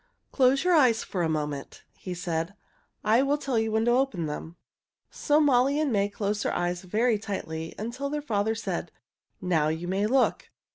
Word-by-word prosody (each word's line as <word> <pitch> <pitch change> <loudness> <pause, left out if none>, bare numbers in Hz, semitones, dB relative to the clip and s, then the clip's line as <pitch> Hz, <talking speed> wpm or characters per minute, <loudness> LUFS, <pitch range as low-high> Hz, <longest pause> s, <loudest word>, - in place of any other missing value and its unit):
"Close 270 +1 +3
your 360 0 +3
eyes 250 -8 +4
for 185 - -3
a 165 - +1
moment," 150 -3 -4
he 180 -1 -6
said. 170 +1 -3 0.5
"I 225 +4 +4
will 280 +2 +1
tell 270 -5 -1
you 220 0 -1
when 220 +1 +1
to 240 - +3
open 245 -9 +1
them." 155 +2 -6 0.6
So 295 +1 +2
Molly 280 -1 +3
and 305 -3 +1
May 200 -2 +1
closed 205 0 -2
their - - -1
eyes 175 0 -1
very 215 +4 +1
tightly 165 -6 -5
until 245 +6 -4
their 300 +1 -2
father 220 -4 0
said, 190 -6 -4 0.5
"Now 170 -5 +1
you 160 +3 -2
may 195 +3 0
look." 260 +2 +1
210 Hz, 185 wpm, -27 LUFS, 175-255 Hz, 0.6 s, eyes